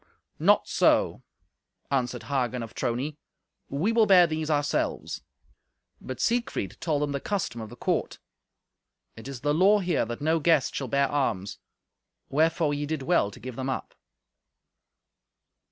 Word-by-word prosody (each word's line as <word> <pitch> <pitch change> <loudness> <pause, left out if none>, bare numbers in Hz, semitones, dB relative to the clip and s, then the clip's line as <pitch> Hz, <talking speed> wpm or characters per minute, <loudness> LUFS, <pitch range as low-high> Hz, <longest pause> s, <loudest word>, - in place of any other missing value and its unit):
"Not - - +4
so," - - +2 0.7
answered 125 -3 -1
Hagen 125 -3 -1
of 115 - -9
Trony; 135 +6 -2 0.5
"we 155 +11 0
will 225 -2 +4
bear 180 -3 +7
these 160 -1 -3
ourselves." 145 -1 -1 0.8
But 130 -1 -7
Siegfried 235 - -1
told 155 -3 0
them 145 - -1
the 140 - -2
custom 155 - -3
of 110 - -7
the 120 - -11
court. - - -1 1.0
"It 115 - -10
is 135 -3 -7
the 145 +1 +1
law 190 +6 +5
here 180 - 0
that 120 +1 -5
no 160 +2 +1
guest 160 -3 +3
shall 135 - -3
bear 140 +2 +2
arms. 110 -9 -1 0.7
Wherefore 160 +1 +2
ye 145 0 -2
did 155 -3 -3
well 135 - +2
to 125 - -13
give 125 +1 -7
them 130 +1 -3
up." 130 - -4
145 Hz, 150 wpm, -27 LUFS, 125-160 Hz, 1.0 s, bear